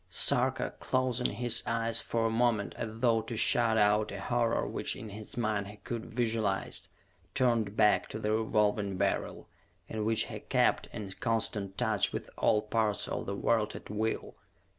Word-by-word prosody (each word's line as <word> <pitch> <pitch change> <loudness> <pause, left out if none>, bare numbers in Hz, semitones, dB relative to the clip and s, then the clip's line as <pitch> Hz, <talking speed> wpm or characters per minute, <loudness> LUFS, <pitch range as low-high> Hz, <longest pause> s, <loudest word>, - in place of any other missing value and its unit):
Sarka, - - +1
closing 130 -1 +1
his 120 -1 +3
eyes 115 0 +1
for 115 -1 -1
a - - +2
moment 115 -3 +1
as 115 - -4
though 115 -3 +3
to 115 +1 -6
shut 115 0 +3
out 105 0 +3
a 100 - -6
horror 115 +2 0
which - - -1
in 110 - -8
his 105 +3 -9
mind 105 -3 0
he 105 +1 -10
could 115 0 -5
visualize, 110 -4 -1 0.5
turned 115 -5 +1
back 105 -1 +3
to - - -5
the 105 -1 -1
Revolving 105 -3 +1
Beryl, 100 0 -1 0.4
in 110 -1 -3
which 110 0 +4
he - - -7
kept - - +1
in 100 -2 -6
constant 105 -4 -1
touch 110 -5 +1
with - - -5
all 105 -1 +3
parts 105 -2 0
of - - -4
the 100 - -2
world 110 +1 +1
at - - -9
will. 110 +1 -2
110 Hz, 170 wpm, -31 LUFS, 105-115 Hz, 0.5 s, which